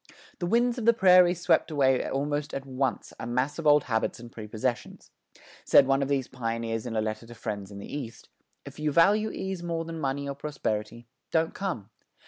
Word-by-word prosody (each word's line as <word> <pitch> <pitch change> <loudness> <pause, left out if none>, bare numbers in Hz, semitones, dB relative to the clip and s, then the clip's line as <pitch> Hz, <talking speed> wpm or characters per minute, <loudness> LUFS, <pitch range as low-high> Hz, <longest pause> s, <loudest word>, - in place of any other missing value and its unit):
The 175 - -2
winds 240 +4 +2
of 225 - -4
the 235 0 +5
prairies 180 -3 +5
swept - - +3
away 135 -4 +2
almost 145 +2 -2
at 135 - -4
once 130 -1 -2
a 115 - -5
mass 125 +6 -1
of 160 - -1
old 145 -1 +6
habits 110 -1 -1
and 120 0 -11
prepossessions. 115 +3 -4 0.5
Said 140 - +6
one 135 +1 +2
of 140 - 0
these 135 -3 0
pioneers 115 -1 -3
in 115 - -4
a 110 - +2
letter 110 +1 -4
to 120 - -11
friends 105 -3 -5
in 100 - -10
the 100 - -7
East: 115 -5 -7 0.4
If - - -10
you 150 0 0
value 205 +8 +4
ease 190 -3 -4
more 165 -1 -3
than 165 0 -6
money 140 0 -2
or 140 - -2
prosperity, 120 -6 -4 0.2
don't 160 0 +1
come. 120 - -4
135 Hz, 200 wpm, -27 LUFS, 115-165 Hz, 0.5 s, old